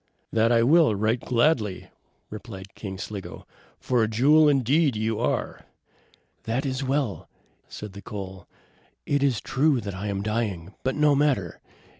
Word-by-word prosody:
"That 115 +1 +3 0.2
will 165 +2 +6
I, - - +1
right 110 +4 0
gladly!" 115 -6 0 0.4
replied 100 -3 -9
King 95 -3 -7
Sligo, 100 0 -7 0.3
"for 125 -2 +1
a 110 - +2
jewel 145 +8 +5
indeed 140 +1 +2
you 110 0 -1
are." - - -2 0.8
"That 125 +5 -1
is 130 0 -2
well!" 135 -5 -2 0.4
said 105 -2 -8
the 100 - -9
coal. 95 -3 -8 0.6
"It 145 -1 +1
is 135 -5 +2
true 135 +1 +2
that 100 -1 -5
I 95 +3 -5
am 100 -1 -2
dying; 105 -5 -2
but 130 0 -1
no 150 -1 +4
matter. 135 - 0
115 Hz, 150 wpm, -25 LUFS, 100-140 Hz, 0.8 s, will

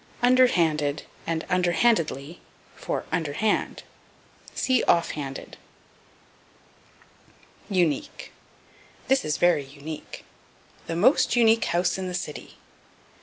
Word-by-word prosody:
Under 255 +1 +6
handed 155 -8 0 0.2
and 165 -1 -2
Under 180 -2 +1
handedly 165 - 0 0.4
for - - -4
Under 160 -5 -1
hand. 215 +7 -1 0.7
See 260 -1 +2
Off 170 -1 +3
handed. 135 -3 -7 2.1
Unique. 175 -8 -1 0.8
"This 265 0 +3
is 150 -1 -1
very 175 -5 +3
unique." 145 +3 -9 0.6
"The 165 - -3
most 255 - +3
unique 225 -1 +4
house 175 +2 0
in 185 - -3
the 180 - -4
city." 165 -5 -7
175 Hz, 105 wpm, -25 LUFS, 150-220 Hz, 2.1 s, Under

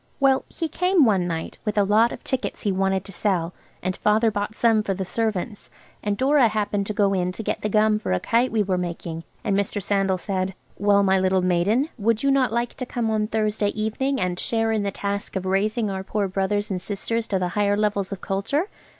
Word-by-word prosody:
Well, 270 -1 +3
he 330 - -3
came 360 -1 +3
one 190 -6 +2
night, 165 -2 -4
with 210 -1 -2
a 205 - +5
lot 215 +4 +4
of - - -8
tickets 260 -1 -3
he 205 - +1
wanted 190 0 0
to 195 - -8
sell, 180 -4 -1 0.3
and 185 0 -1
Father 220 +2 +2
bought 205 +1 -3
some 225 -2 +3
for 195 -2 -2
the 190 0 -3
servants, 215 0 -3 0.3
and 205 -1 -1
Dora 270 0 +4
happened 205 -2 -1
to 210 - -2
go 200 -1 +3
in 180 -1 0
to 220 - -6
get - - -2
the 210 - -1
gum 215 0 +3
for - - -3
a 90 - +2
kite 240 - +1
we 220 -2 +2
were 185 -2 0
making, 170 -2 -5 0.2
and 205 -4 +1
Mr. 200 +1 0
Sandal 195 -1 +1
said, 190 0 -2 0.2
"Well, 200 0 +4
my 190 -1 +3
little 185 0 +2
maiden, 190 - +2
would 225 +2 +1
you 275 - +3
not 260 -4 +3
like 235 +1 -1
to 255 - -4
come 230 -3 -1
on 215 -1 +1
Thursday 215 -1 0
evening, 265 +6 -1
and 180 -1 -1
share 225 -1 0
in 220 -1 +1
the 200 - -1
task 200 +1 -4
of 190 -1 -2
raising 210 +3 0
our 190 0 -4
poor 205 0 -1
brothers 200 +2 -1
and 180 -2 -2
sisters 225 +4 -2
to 195 - 0
the 180 -1 -1
higher 205 +2 +1
levels 205 -2 0
of 195 - -5
culture?" 280 - -1
205 Hz, 225 wpm, -24 LUFS, 190-225 Hz, 0.3 s, a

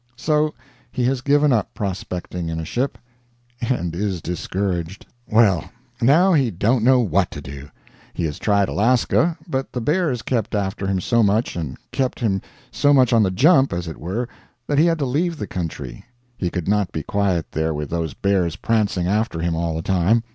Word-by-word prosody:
So 150 +3 +1 0.4
he 125 - -2
has 130 +1 +1
given 145 +1 +3
up 110 -5 -1
prospecting 90 -3 -4
in 80 0 -3
a 80 - -4
ship, 125 - -2 0.6
and 115 -9 -1
is 95 -1 -1
discouraged. 90 +1 -3 0.2
Well, 105 -7 +3 0.3
now 165 +10 +5
he 135 -6 +3
don't 110 +5 +1
know 130 +1 +5
what 95 -4 +1
to 80 - -8
do. 70 0 -9 0.4
He - - -4
has 75 -2 -4
tried 100 -2 +2
Alaska; 130 - +2
but 135 -4 -3
the 125 - -2
bears 150 -2 0
kept 115 -4 -1
after 100 -1 -2
him 95 -1 0
so 115 +5 +2
much, 110 +2 +1
and 80 -6 -4
kept 130 -2 -1
him 100 -5 0 0.3
so 145 0 +3
much 130 -2 +4
on 115 - +5
the 100 - +3
jump, 135 - +4
as 85 -1 -3
it 80 - -7
were, 100 +10 -3 0.4
that 145 +2 +1
he 165 - +5
had 165 -1 +2
to 145 - -1
leave 160 +6 0
the 105 - -4
country. 80 -9 -6 0.3
He 90 -6 -2
could 90 -2 -4
not 105 -2 +1
be 80 - -4
quiet 95 -5 -1
there 80 +1 0
with 75 -1 -5
those 80 -4 -2
bears 95 -4 +1
prancing 105 -6 0
after 105 -2 0
him 85 0 0
all 85 -1 -1
the 80 - -3
time. 95 +6 +2
100 Hz, 190 wpm, -21 LUFS, 85-125 Hz, 0.6 s, now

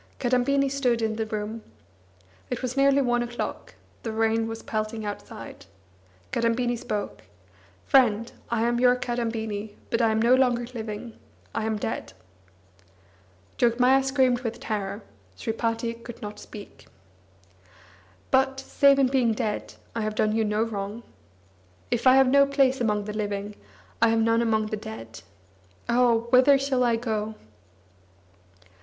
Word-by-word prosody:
Kadambini 265 +2 +2
stood 260 -4 +1
in 220 -1 0
the 220 -1 -2
room. 215 +1 -4 0.9
It - - -4
was 255 0 -2
nearly 275 0 +4
one 240 -1 +1
o'clock, 240 0 -5 0.3
the 225 - -4
rain 225 0 +1
was 225 0 -6
pelting 215 0 -3
outside. 205 0 -8 0.6
Kadambini 240 +1 +1
spoke: 210 -3 -4 0.6
"Friend, 230 -5 +3 0.2
I 230 -1 0
am 240 0 +1
your 250 0 +5
Kadambini, 225 -4 -3 0.2
but 230 - +1
I 225 - +4
am 220 0 +1
no 235 +3 +4
longer 250 -2 +3
living. 220 0 -6 0.3
I 220 - -2
am 220 -1 -1
dead." 215 - -4 1.5
Jogmaya 250 +3 +4
screamed 260 -2 +2
with 235 -2 -5
terror; 205 -1 -4 0.3
Sripati 230 - -2
could 235 0 -11 0.2
speak. 205 -1 -12 1.4
"But, 265 0 +2
save 275 +1 +4
in 275 - +4
being 255 -3 +2
dead, 210 -1 -3 0.2
I 230 - -1
have 215 0 -2
done 215 0 +2
you 225 - +2
no 210 +1 +1
wrong. 210 0 -5 0.9
If 240 +1 +1
I 255 - +8
have 270 -1 +6
no 280 +2 +5
place 270 -2 +2
among 210 -3 +1
the 210 +1 -6
living, 205 -1 -3 0.5
I 230 - +6
have 225 0 +2
none 230 +1 +3
among 220 -2 +1
the - - 0
dead. 115 - -9 0.7
Oh! 235 -1 +3
whither 260 +2 +6
shall 270 -2 0
I 235 -1 +3
go?" 220 -2 -3
230 Hz, 140 wpm, -26 LUFS, 220-250 Hz, 1.5 s, I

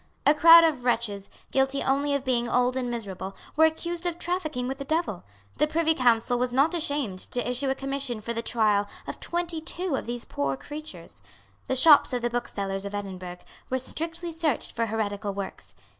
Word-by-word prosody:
A 290 - +7
crowd 330 +2 +9
of 300 -7 +1
wretches, 225 -5 -1 0.2
guilty 270 +1 +1
only 280 +1 +1
of 280 - -2
being 240 -2 +1
old 250 +1 +2
and 255 -2 -2
miserable, 195 -5 -5 0.2
were 320 +1 +6
accused 340 +2 -1
of 345 -1 -3
trafficking 310 -9 -2
with 270 +2 -4
the - - -3
devil. 295 - -2 0.4
The 300 - +4
Privy 320 +1 +2
Council 245 -2 +2
was 250 0 0
not 275 +7 +3
ashamed 285 - -1
to 245 -1 -2
issue 250 +2 -1
a 265 - +1
Commission 275 -3 -3
for 230 +2 -4
the 230 - -2
trial 210 -3 +2 0.2
of - - -6
twenty 345 -2 -2
two 350 0 -3
of - - -4
these 240 0 -4
poor 140 -1 -2
creatures. 305 - -9 0.5
The 260 - 0
shops 285 0 +7
of 245 -1 -1
the 240 - 0
booksellers 200 -5 -3
of 200 0 -5
Edinburgh 185 -3 -7 0.2
were 260 - 0
strictly 330 +6 -4
searched 315 -4 -1
for 230 -1 -1
heretical 205 -2 -2
works. 95 - -7
255 Hz, 190 wpm, -26 LUFS, 225-310 Hz, 0.5 s, crowd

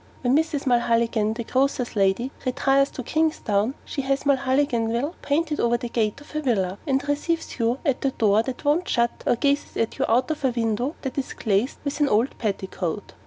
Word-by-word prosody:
When 250 +1 +3
Mrs. 305 -2 0
Mulholligan, 230 -3 +2
the 235 - -4
grocer's 255 -1 0
lady, 200 +6 +1
retires 270 +2 +2
to 255 - -7
Kingstown, 255 -6 0
she 280 - -3
has 270 0 0
Mulholliganville' 265 -1 +1
painted 300 +1 0
over 235 0 +2
the 240 0 -5
gate 220 +1 0
of 290 - -15
her 305 - -2
villa; 200 -8 0
and 270 +1 0
receives 300 +1 -2
you 235 +2 +1
at 275 -4 0
a 275 - +3
door 215 -4 +3
that 255 +4 -6
won't 305 +5 +2
shut 235 -1 0
or - - +4
gazes 280 +3 0
at 230 +4 -1
you 270 - +2
out 250 +6 +2
of 305 -2 -4
a 265 - +4
window 235 +4 -1
that 265 0 -2
is 265 - -4
glazed 215 +4 0
with 285 0 -3
an 290 -2 +3
old 225 +6 +2
petticoat. 195 -3 -3
255 Hz, 195 wpm, -24 LUFS, 230-280 Hz, -, or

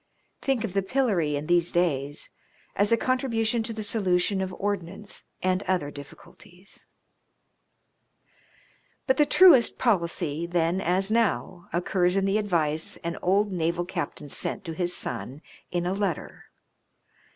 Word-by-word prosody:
Think 265 -4 0
of 210 -5 -4
the 195 - +2
pillory 190 - 0
in 145 +1 -3
these 175 +1 +2
days 145 -5 -1 0.4
as 205 +2 +2
a 230 - +5
contribution 235 -3 0
to 225 +1 -5
the 215 -1 -5
solution 195 -2 +1
of 190 0 -3
ordnance 200 0 -5 0.2
and 185 0 +1
other 175 -6 0
difficulties! 175 +6 -15 2.2
But 260 -1 +2
the 295 - +4
truest 335 -11 +6
policy, 170 - 0
then 175 +1 0
as 190 +4 +2
now, 200 -5 0
occurs 180 +1 +1
in 195 - +2
the 195 +2 +2
advice 160 -6 0
an 170 0 -3
old 200 +3 +2
naval 170 0 -1
captain 175 -4 -5
sent 190 +7 -3
to 165 - -4
his 175 +2 -1
son 140 +5 -4 0.3
in 175 -1 -2
a 180 - 0
letter. 195 -5 -3
185 Hz, 140 wpm, -26 LUFS, 170-210 Hz, 2.2 s, truest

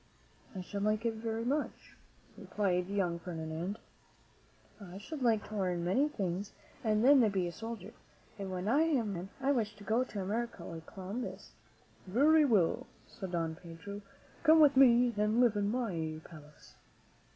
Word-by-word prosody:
"I 185 - -4
should 200 +2 -5
like 215 +2 0
it 230 - +1
very 225 +1 -3
much," 285 +4 -3 0.4
replied 180 -3 -1
the 200 - -4
young 175 -4 0
Ferdinand. 165 +3 -4 1.1
"I 180 -1 -9
should 280 +8 -7
like 225 -4 +2
to 215 - -6
learn 180 -4 -1
many 265 +12 +2
things 195 - -3 0.3
and 215 0 +2
then 280 +1 +8
be 190 -3 0
a 175 - -3
soldier; 225 0 -7 0.5
and 195 -1 -4
when 185 +1 -4
I 275 +7 +4
am 280 -10 +1
a - - -3
man 180 +1 -6
I 270 +1 +1
wish 220 -6 0
to 205 - -13
go 225 +4 +2
to 215 -5 -6
America 220 -1 -3
like 165 -1 -8
Columbus." 205 +5 -6 0.6
"Very 295 +10 +5
well," 205 -11 +2 0.2
said 190 -2 -8
Don 165 -2 -1
Pedro; 180 +4 -9 0.4
"come 320 0 +6
with 290 -2 +6
me 245 -2 +6
and 210 +2 +2
live 240 -4 +4
in 205 0 0
my 170 -10 -2
palace." 150 -2 -15
205 Hz, 170 wpm, -32 LUFS, 180-235 Hz, 1.1 s, then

